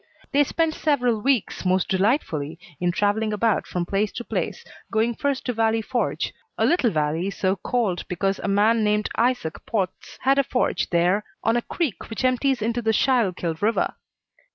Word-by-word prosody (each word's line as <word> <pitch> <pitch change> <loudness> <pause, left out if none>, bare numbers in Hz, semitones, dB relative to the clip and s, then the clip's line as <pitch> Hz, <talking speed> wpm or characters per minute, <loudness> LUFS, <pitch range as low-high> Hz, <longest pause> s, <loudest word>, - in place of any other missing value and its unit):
They 285 +1 +5
spent 325 +2 0
several 250 -9 +1
weeks 260 -3 0
most 185 0 +2
delightfully 185 - 0 0.2
in 175 0 +1
travelling 210 +3 +1
about 215 +1 +1
from 175 -1 -2
place 200 +3 0
to 240 - -5
place, - - -3 0.3
going 225 +2 +2
first 280 +3 -2
to 250 - -1
Valley 225 0 +1
Forge 245 +2 -1 0.2
a - - +2
little 335 -9 +3
valley 160 +2 0
so 195 -1 0
called 200 -3 -1
because 195 +2 -1
a - - -3
man 215 +3 +3
named 210 0 +1
Isaac 235 -9 0
Potts 190 -5 -3
had 275 +1 +3
a - - +4
forge 255 -1 0
there 180 +4 +2 0.2
on 225 +1 +2
a 240 - +2
creek 300 - -3
which 225 +3 -2
empties 255 -1 +2
into 235 +2 0
the 220 -1 +1
Schuylkill 200 -9 +1
River. 220 +3 +1
220 Hz, 175 wpm, -24 LUFS, 190-245 Hz, 0.3 s, They